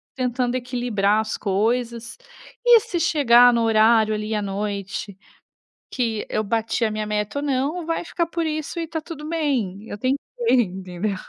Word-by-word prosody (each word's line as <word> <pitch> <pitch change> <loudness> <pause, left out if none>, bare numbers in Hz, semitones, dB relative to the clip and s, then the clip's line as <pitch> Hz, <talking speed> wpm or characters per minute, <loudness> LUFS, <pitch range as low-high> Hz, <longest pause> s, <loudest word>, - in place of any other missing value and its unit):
tentando 250 -1 -1
equilibrar 240 -5 0
as 220 0 -4
coisas. 230 +4 -1 0.5
E 480 -1 +8
se 355 -5 -4
chegar 245 -6 +5
no 235 - +2
horário 220 0 +4
ali 215 +1 -3
à 210 - 0
noite, 200 0 -4 0.8
que 230 -4 -2
eu 215 - -1
bati 225 +2 0
a 220 - +1
minha 215 0 -3
meta 210 +5 -2
ou 285 - -3
não, 290 +5 -1
vai 330 +1 -2
ficar 340 0 -1
por 335 0 -3
isso 310 +2 -3
e - - -1
está 325 0 -4
tudo 305 -2 -8
bem, 255 - -1
eu - - -5
tentei", 255 +5 +1 0.3
entendeu? 190 -3 0
235 Hz, 165 wpm, -22 LUFS, 210-285 Hz, 0.8 s, E